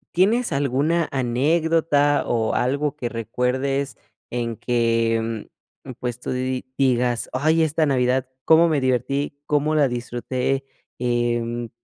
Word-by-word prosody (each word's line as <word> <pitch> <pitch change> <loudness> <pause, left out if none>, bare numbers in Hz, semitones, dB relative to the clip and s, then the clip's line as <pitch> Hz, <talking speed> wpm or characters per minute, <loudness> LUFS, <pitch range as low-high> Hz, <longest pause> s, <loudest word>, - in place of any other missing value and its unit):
¿tienes 220 +7 +3
alguna 145 +5 +1
anécdota 145 +3 +2
o 115 -2 0
algo 140 +4 0
que 120 -5 -4
recuerdes 125 +3 -1 0.4
en 115 -1 -2
que, 115 -2 0 0.5
pues 125 -1 -4
tú - - -5
digas: 130 -1 0
"Ay 155 +5 +2
esta 160 0 +2
navidad, 130 -1 +1 0.2
cómo 165 +1 +6
me 145 -4 +1
divertí, 140 +3 -1
cómo 150 +1 +1
la 145 -3 +4
disfruté", 125 +2 -2 0.3
eh, 120 -1 -1
130 Hz, 110 wpm, -22 LUFS, 120-145 Hz, 0.5 s, cómo